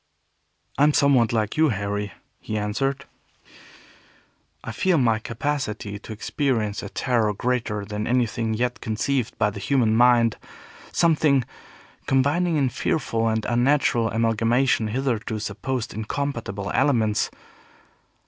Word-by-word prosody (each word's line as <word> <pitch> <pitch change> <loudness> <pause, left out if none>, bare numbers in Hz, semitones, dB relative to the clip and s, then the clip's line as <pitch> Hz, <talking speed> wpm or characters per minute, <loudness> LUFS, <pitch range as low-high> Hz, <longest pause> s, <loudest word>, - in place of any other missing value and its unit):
"I - - +5
am 150 - +3
somewhat 135 -6 +4
like 110 0 -1
you, 160 -1 +4
Harry," 105 -1 -2 0.3
he 110 - -4
answered. 135 +7 -2 1.6
"I - - -5
feel 180 +10 +1
my 115 -5 +2
capacity 110 -4 -3
to 110 - -11
experience 110 -2 -1
a 100 - -7
terror 115 -4 0
greater 115 -3 -1
than 105 +1 -4
anything 115 -2 0
yet 125 +2 -2
conceived 115 +3 -1
by 105 -1 +2
the 100 - -8
human 115 0 +2
mind; 120 -1 +4 0.5
something 150 -6 +3 0.6
combining 145 +6 +2
in 135 -3 +2
fearful 115 -3 -1
and 110 -1 0
unnatural 120 -2 +2
amalgamation 115 +2 +1
hitherto 115 -2 -2
supposed 110 +4 -4
incompatible 110 -3 -4
elements. 115 -6 +2
115 Hz, 120 wpm, -24 LUFS, 110-135 Hz, 1.6 s, I